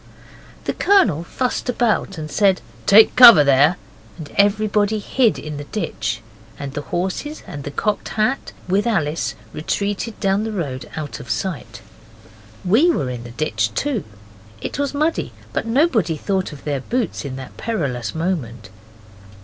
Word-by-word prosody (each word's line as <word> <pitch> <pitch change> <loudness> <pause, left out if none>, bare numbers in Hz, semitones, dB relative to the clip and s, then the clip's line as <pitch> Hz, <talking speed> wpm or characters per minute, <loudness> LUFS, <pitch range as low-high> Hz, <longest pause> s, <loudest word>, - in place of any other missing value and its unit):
The - - -2
Colonel 220 - +3
fussed 250 +7 -2
about 230 -6 0
and 155 -1 -6
said, 195 -3 +3 0.3
'Take 215 +2 +7
cover 235 -11 +10
there!' 140 +5 +4 0.4
and 155 -4 -9
everybody 210 +1 +2
hid 220 - +1
in 150 +2 -6
the 145 - -6
ditch, 115 - -3 0.4
and 140 -1 -6
the 145 - -3
horses 190 - -4
and 145 -1 -7
the 145 - -5
Cocked 205 +8 -2
Hat, 220 +5 -1 0.2
with 195 +5 +1
Alice, 165 -8 0 0.2
retreated 205 +7 -3
down 195 +1 +1
the 220 - -3
road 145 -10 -4
out 155 -2 -5
of 120 - -11
sight. 140 - -4 0.8
We 230 - +4
were 135 - 0
in 120 -1 -6
the - - -8
ditch 115 -4 -2
too. 280 -9 -1 0.6
It - - -5
was 285 0 -1
muddy 310 +3 0 0.2
but - - -2
nobody 230 - +2
thought 190 +3 -1
of 145 - -11
their 145 -2 -1
boots 235 - -2
in 135 -3 -5
that 130 -1 -9
perilous 140 - -3
moment. 125 - -3
185 Hz, 155 wpm, -20 LUFS, 145-220 Hz, 0.8 s, cover